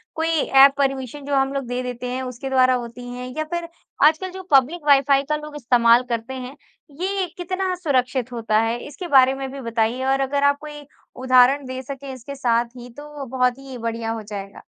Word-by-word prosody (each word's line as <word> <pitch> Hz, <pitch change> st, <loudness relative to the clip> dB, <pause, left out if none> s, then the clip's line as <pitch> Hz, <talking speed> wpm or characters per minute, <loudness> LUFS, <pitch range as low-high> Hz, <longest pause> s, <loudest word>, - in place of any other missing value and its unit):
कोई 320 Hz, 0 st, -1 dB
app 275 Hz, -4 st, +5 dB
permission 270 Hz, 0 st, -2 dB
जो 285 Hz, 0 st, -1 dB
हम 270 Hz, 0 st, +1 dB
लोग 275 Hz, -3 st, -3 dB
दे 245 Hz, +1 st, -2 dB
देते 250 Hz, 0 st, -5 dB
हैं 255 Hz, +1 st, -3 dB
उसके 255 Hz, +1 st, -6 dB
द्वारा 255 Hz, -1 st, +4 dB
होती 245 Hz, 0 st, -5 dB
हैं, 250 Hz, +1 st, -6 dB
या 310 Hz, -, 0 dB
फिर 345 Hz, -1 st, -2 dB, 0.4 s
आजकल 320 Hz, +5 st, +3 dB
जो 375 Hz, 0 st, -8 dB
पब्लिक 290 Hz, +4 st, +3 dB
वाईफाई 275 Hz, 0 st, +5 dB
का 300 Hz, -, +2 dB
लोग 300 Hz, 0 st, -8 dB
इस्तेमाल 240 Hz, -2 st, +4 dB
करते 230 Hz, +2 st, -3 dB
हैं, 255 Hz, +1 st, -7 dB, 0.5 s
ये 385 Hz, 0 st, 0 dB
कितना 370 Hz, +1 st, -2 dB
सुरक्षित 260 Hz, -7 st, -1 dB
होता 225 Hz, -2 st, 0 dB
है? 225 Hz, +1 st, -1 dB
इसके 300 Hz, +5 st, -8 dB
बारे 265 Hz, -4 st, +5 dB
में 270 Hz, 0 st, -5 dB
भी 275 Hz, 0 st, -7 dB
बताइए 230 Hz, +1 st, -1 dB
और 270 Hz, 0 st, +2 dB
अगर 280 Hz, +1 st, 0 dB
आप 285 Hz, 0 st, +4 dB
कोई 295 Hz, -1 st, -9 dB, 0.4 s
उदहारण 260 Hz, +2 st, +5 dB
दे 260 Hz, 0 st, -5 dB
सकें 275 Hz, +1 st, -7 dB
इसके 260 Hz, +2 st, -9 dB
साथ 240 Hz, -3 st, +1 dB
ही, 245 Hz, 0 st, -10 dB
तो 295 Hz, +1 st, -9 dB
वो 275 Hz, -, -4 dB
बहुत 250 Hz, 0 st, +2 dB
ही 270 Hz, -2 st, -9 dB
बढ़िया 230 Hz, -1 st, -3 dB
हो 225 Hz, -1 st, -4 dB
जाएगा। 200 Hz, -1 st, -8 dB
265 Hz, 205 wpm, -22 LUFS, 245-285 Hz, 0.5 s, app